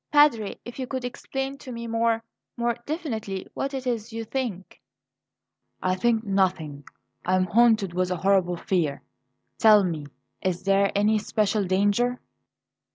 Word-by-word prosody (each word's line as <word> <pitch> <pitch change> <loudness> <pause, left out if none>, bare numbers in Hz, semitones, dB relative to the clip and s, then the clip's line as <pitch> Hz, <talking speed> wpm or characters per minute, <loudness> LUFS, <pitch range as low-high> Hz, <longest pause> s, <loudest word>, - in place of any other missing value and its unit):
"Padre, 290 -9 +4
if 240 +2 -9
you 260 - -3
could 260 -1 -3
explain 270 +2 -4
to 260 - -9
me 235 -1 -5
more 230 0 +1 0.3
more 235 0 +1
definitely, 225 - -3
what 275 - -2
it 265 -2 -4
is 235 -2 -2
you 225 0 -4
think 225 -6 -4 0.5
" - - -25
"I - - +3
think 225 +3 +1
nothing; 185 -8 0 0.4
I 185 - +2
am 185 0 +3
haunted 215 -1 +3
with 180 0 0
a 180 - 0
horrible 185 -1 +2
fear. 165 -6 -1 0.6
Tell 215 -2 +7
me, 160 -5 -3 0.3
is 185 -1 -1
there 195 +1 +3
any 210 +2 +3
special 210 -1 0
danger?" 205 +7 +2
215 Hz, 155 wpm, -25 LUFS, 185-240 Hz, 0.6 s, Tell